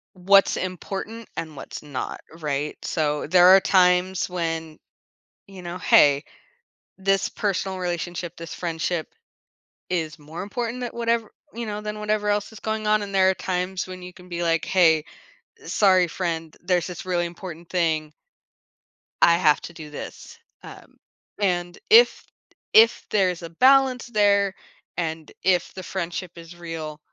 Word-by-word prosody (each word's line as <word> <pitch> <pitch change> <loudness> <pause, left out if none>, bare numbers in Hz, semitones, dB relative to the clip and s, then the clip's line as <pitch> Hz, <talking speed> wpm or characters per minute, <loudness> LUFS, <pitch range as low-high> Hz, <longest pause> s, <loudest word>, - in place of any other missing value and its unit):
what's 195 +2 +4
important 195 +5 -5
and 160 -2 -5
what's - - -8
not, 145 -4 -5 0.2
right? 150 -1 -2
So 150 -2 -1
there 180 +2 +6
are 190 +1 +9
times 180 -1 +3
when, 165 -3 -3 0.7
you 195 -2 -11
know, 175 0 -6
"Hey, 145 -4 +5 0.7
this 195 0 +1
personal 190 -2 -2
relationship, 175 -1 -4
this 165 -1 -8
friendship, 165 -1 -2 0.8
is 160 -3 -2
more 160 +4 -7
important 235 +4 -4
tha 245 - -3
whatever," 230 -2 -1 0.2
you 235 0 -5
know, 210 -1 -4
"than 210 0 -5
whatever 210 0 -1
else 205 +1 0
is 220 - -12
going 220 -1 -3
on." 215 0 +3
And 200 -1 -6
there 190 -1 +5
are - - +3
times 180 +1 -2
when 185 0 -8
you 180 - -8
can 180 0 -16
be 175 -1 -4
like, 165 -1 +1
"Hey, 160 -4 +4 0.6
sorry, 185 -3 +4
friend. 165 -2 -4
There's 175 -1 0
this 180 +1 -7
really 175 -1 0
important 170 -1 -9
thing." 160 -4 0 1.1
I 170 0 +6
have 155 -4 +3
to 175 - -9
do 155 -2 -10
this. 150 - -9 0.2
Um, - - -13 0.4
and 175 -3 -1
if 460 +2 +6 0.5
if 230 +2 +6
there's 180 -4 +1
a 165 - -6
balance 260 +6 +4
there 200 -3 +2 0.4
and 160 -2 -4
if 180 -2 +2
the 185 - -8
friendship 175 0 -4
is 170 +1 -11
real, 165 -3 -7
180 Hz, 150 wpm, -24 LUFS, 165-200 Hz, 1.1 s, are